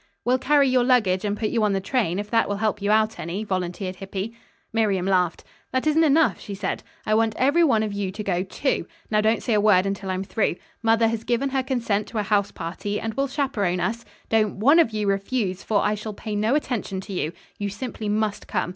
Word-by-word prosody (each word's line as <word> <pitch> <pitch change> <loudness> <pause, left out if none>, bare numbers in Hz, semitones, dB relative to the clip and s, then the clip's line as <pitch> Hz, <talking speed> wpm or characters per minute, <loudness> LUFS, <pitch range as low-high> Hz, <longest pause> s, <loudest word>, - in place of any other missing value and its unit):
"We'll 250 +1 +3
carry 285 +1 +4
your 255 -1 +3
luggage 215 -8 +3
and 205 0 -1
put 215 -1 -1
you 230 - +1
on 210 -1 +2
the 195 - +1
train, 195 -4 0
if 205 +1 -3
that 225 -2 +2
will 205 - 0
help 210 -1 -1
you 200 - 0
out 215 +1 +2
any," 175 +6 -3
volunteered 185 -1 -3
Hippy. 195 +3 -5 0.4
Miriam 205 -5 +1
laughed. 180 -3 +1 0.3
"That 260 +2 0
isn't 310 +1 +4
enough," 315 +1 +3
she 200 - -7
said. 195 -1 -3 0.2
"I 215 - +1
want 220 0 +2
every 285 +7 +4
one 230 -9 +3
of 210 -2 -3
you 200 -1 -2
to 210 +2 -5
go, 180 -3 0
too, 195 +8 -1 0.2
Now 210 0 +3
don't 220 +1 +1
say 235 - 0
a 210 - +3
word 200 -3 +5
until 195 0 -3
I'm 185 0 -1
through. 195 -1 0 0.3
Mother 225 0 +3
has 225 0 -2
given 245 +4 0
her 265 0 0
consent 235 -6 -1
to 230 - -6
a 210 - +1
house 205 -1 +1
party, 195 +5 -4
and 225 0 -3
will 275 +3 0
chaperon 255 -11 -1
us. 230 +6 -2 0.2
Don't 215 -2 +2
one 280 +11 +5
of 325 - +5
you 215 -1 -2
refuse, 195 -1 -1
for 210 -2 +1
I 210 - +2
shall 210 0 -5
pay 215 0 -5
no 215 +6 +2
attention 240 -9 -2
to 195 - -8
you. 165 -3 -1 0.3
You 205 0 -2
simply 215 0 -5
must 210 0 -1
come. 185 -4 -1
215 Hz, 235 wpm, -24 LUFS, 195-235 Hz, 0.4 s, word